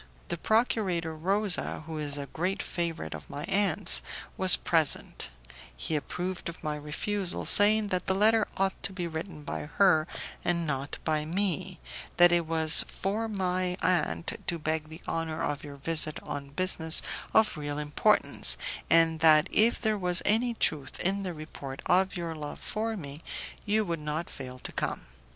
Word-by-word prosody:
The - - -3
procurator 195 -8 0
Rosa, 195 +1 0
who 160 -1 -6
is 145 -1 0
a 140 - -5
great 180 +7 -3
favourite 170 -2 -4
of - - -10
my 145 - -6
aunt's, 200 +4 +3 0.3
was 185 -1 +8
present; 160 - 0 0.5
he 155 - -3
approved 180 +4 -4
of 170 - -11
my 150 -1 -2
refusal, 175 +6 -3
saying 210 +1 +4
that 185 -2 -3
the 190 - +1
letter 215 +2 +3
ought 195 0 -1
to 200 - -4
be 180 -2 -4
written 160 -1 -7
by 150 - -5
her 160 -3 +2 0.4
and 170 -1 -1
not 140 -2 -4
by 155 -1 -1
me, 185 +2 -3 0.4
that 175 0 +6
it 170 -2 +1
was 160 -1 +7
for 210 +4 -3
my 185 -2 -2
aunt 85 - -1
to 170 - -1
beg 155 -1 -3
the 160 +1 -11
honour 165 -1 -3
of 145 0 -3
your 145 -1 -9
visit 155 +1 +2
on 145 -1 -7
business 160 0 0 0.3
of 220 -3 +3
real 145 -1 -5
importance, 150 0 +6 0.3
and 165 -1 +4
that, 155 +1 +5
if 230 +3 +3
there 215 -2 -1
was 180 -1 +1
any 235 +3 +2
truth 145 -10 -2
in 195 +2 0
the 185 -2 -4
report 140 -3 -9
of 190 +1 +1
your 170 -2 -4
love 150 -2 -7
for 220 +1 -4
me, 145 -4 -8 0.5
you 215 +1 +1
would 170 -3 -3
not 150 +3 -5
fail 130 -1 -9
to - - -6
come. - - -3
170 Hz, 170 wpm, -28 LUFS, 155-190 Hz, 0.5 s, was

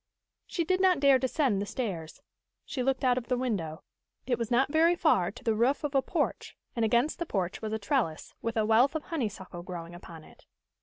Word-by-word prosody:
She 340 - -1
did 370 +3 +1
not 370 -4 +4
dare 275 -2 +5
descend 260 -5 +1
the 205 - -3
stairs. 180 -12 -5 0.4
She 260 - -3
looked 265 +1 0
out 250 -1 +3
of 235 - -13
the 250 - +1
window. 195 -11 -2 0.4
It 245 -2 0
was 230 -2 -2
not 265 +3 +2
very 330 +3 +4
far 250 - +3
to 200 - -12
the 225 - +2
roof 245 +8 +1
of 295 -1 -2
a 270 - +4
porch, - - -2 0.2
and 230 - 0
against 240 +9 +2
the 340 - -1
porch 185 - -2
was 215 -1 -4
a 220 - 0
trellis, 210 - -1
with 230 0 -3
a 215 - +2
wealth 235 +7 +4
of 310 - -2
honeysuckle 205 - -4
growing 175 -1 -7
upon 170 -2 -11
it. - - -19
240 Hz, 215 wpm, -29 LUFS, 200-275 Hz, 0.4 s, dare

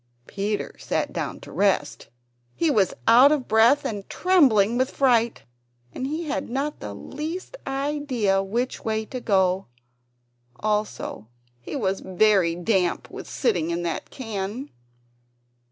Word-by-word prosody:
Peter 205 +1 -3
sat - - -2
down - - -4
to - - -12
rest; 195 -7 0 0.5
he 330 -2 +2
was 200 -8 +2
out 250 +5 +8
of 290 -4 0
breath 225 +6 +4
and 205 -3 -4
trembling 250 - +4
with 260 +2 +1
fright, 235 -4 +2 0.5
and 260 - -3
he 310 +4 -3
had 305 - -3
not 280 +4 -2
the - - -7
least 330 +9 -6
idea 270 -8 0
which 235 +6 -2
way 220 0 -1
to 255 - -6
go. 190 -3 +2 0.9
Also 210 - -2 0.3
he 120 - -7
was 195 -7 0
very 190 -3 +3
damp 180 0 0
with - - -8
sitting 180 - 0
in 170 +1 -2
that 170 - -3
can. 225 +2 -5
220 Hz, 135 wpm, -24 LUFS, 195-270 Hz, 0.9 s, out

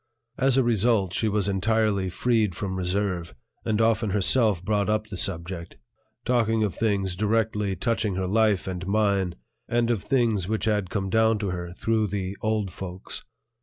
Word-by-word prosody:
As 135 0 +3
a 135 - +5
result, 110 -5 +2
she 110 - +1
was 105 -1 0
entirely 100 -1 +1
freed 110 -1 +1
from 95 0 -3
reserve, 90 -4 -2 0.3
and 110 -1 0
often 115 -1 +2
herself 100 -1 +2
brought 105 -2 +1
up 110 0 +1
the 105 -2 -8
subject, 85 -2 -2 0.5
talking 115 -3 +2
of 100 -5 -1
things 100 -4 0
directly 105 -1 0
touching 110 0 0
her 95 0 -1
life 105 0 +2
and 95 -1 -5
mine 100 -3 +1 0.3
and 120 0 +2
of 110 -5 0
things 115 -8 +1
which 110 +2 -1
had 105 -4 0
come 95 -1 -2
down 110 0 +3
to 100 -3 -2
her 85 -1 -5
through 110 +2 0
the 95 -1 -3
"old 110 -3 0
folks." 95 0 -7
105 Hz, 165 wpm, -25 LUFS, 95-110 Hz, 0.5 s, a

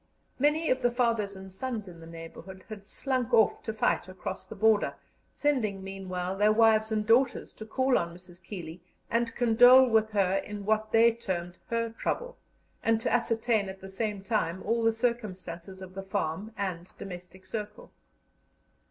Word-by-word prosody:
Many 300 +4 +2
of 255 0 +1
the 245 - +3
fathers 230 -5 0
and 190 0 -10
sons 225 -1 -4
in 170 -2 -11
the 165 - -11
neighbourhood 165 +3 -10
had 205 -2 -9
slunk 255 -2 -2
off 220 -3 +4
to 220 - -4
fight 215 -4 0
across 185 - -6
the 220 - -8
border, 215 0 +3 0.4
sending 220 -10 0
meanwhile 190 -1 -4
their 210 +2 +4
wives 220 0 +4
and 215 -1 0
daughters 240 +3 +2
to 220 - -10
call 260 +2 +2
on 170 0 -4
Mrs. 180 0 -14
Keeley 170 -4 -8 0.3
and 230 0 0
condole 245 +2 +7
with 220 -2 +3
her 195 -3 +2
in 205 0 -5
what 215 +1 +1
they 230 +1 +6
termed 180 -6 -4
"her 230 -1 -1
trouble," - - -3 0.5
and 225 -1 +2
to - - 0
ascertain 225 -3 +1
at 190 0 -8
the 190 - -10
same 205 0 -3
time 190 -5 -1
all 230 +2 +1
the 225 - +5
circumstances 190 -6 -3
of 185 0 -10
the 195 - -5
farm 195 +1 -3
and 185 -3 -4
domestic 180 0 -9
circle. 210 +1 -6
210 Hz, 170 wpm, -29 LUFS, 190-230 Hz, 0.5 s, condole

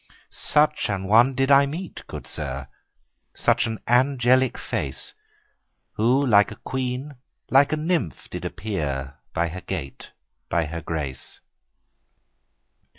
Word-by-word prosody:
Such 150 -3 +3
a 100 - 0
one 110 +7 +4
did 135 +1 +2
I 140 0 +7
meet, 165 +6 -6
good - - -8
sir, 70 -3 -4 0.7
Such - - +2
an 110 -1 -4
angel 125 0 +4
like 130 -2 -1
face, 70 -3 -4 0.8
Who 125 +6 +2
like 105 -5 +5
a 110 - -8
queen, 130 +3 -4 0.3
like 135 +2 +5
a 155 - +1
nymph, 160 - -1
did - - -5
appear, 70 -9 -4 0.2
By 85 0 +1
her 90 +3 -7
gait, 80 -9 -6 0.4
by 85 0 +1
her 85 +2 -5
grace. 75 -4 -5
110 Hz, 130 wpm, -24 LUFS, 80-135 Hz, 0.8 s, I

